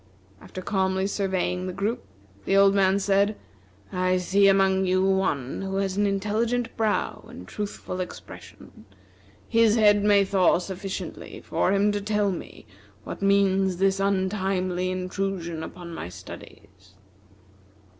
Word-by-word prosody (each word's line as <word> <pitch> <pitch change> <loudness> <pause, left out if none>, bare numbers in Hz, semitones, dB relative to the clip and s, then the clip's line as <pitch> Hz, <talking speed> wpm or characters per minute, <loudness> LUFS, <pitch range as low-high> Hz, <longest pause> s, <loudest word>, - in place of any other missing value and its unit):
After 185 - -9
calmly 190 -1 0
surveying 190 -2 -1
the 185 - -4
group, 205 +5 -2 0.4
the 195 - +2
old 195 0 +6
man 195 -1 +3
said: 200 +1 +1 0.5
"I 185 0 +1
see 195 +2 +3
among 190 -1 +3
you 185 +1 +2
one 185 -10 0
who 195 0 -4
has 195 -1 -1
an 205 0 +2
intelligent 225 +4 -1
brow 220 -2 -1
and 90 - -11
truthful 200 - -5
expression. 180 -9 -10 0.6
His 230 -2 +4
head 205 -2 +4
may 205 -1 +4
thaw 190 -3 +3
sufficiently 190 +2 -6
for - - 0
him 200 +1 +3
to 205 0 -2
tell 210 -1 0
me 175 - -8 0.4
what - - -7
means 195 -2 +2
this 195 +1 +2
untimely 190 -2 0
intrusion 185 -2 -3
upon 170 +1 -8
my 90 - -6
studies." 95 +1 -13
195 Hz, 135 wpm, -25 LUFS, 185-200 Hz, 0.6 s, old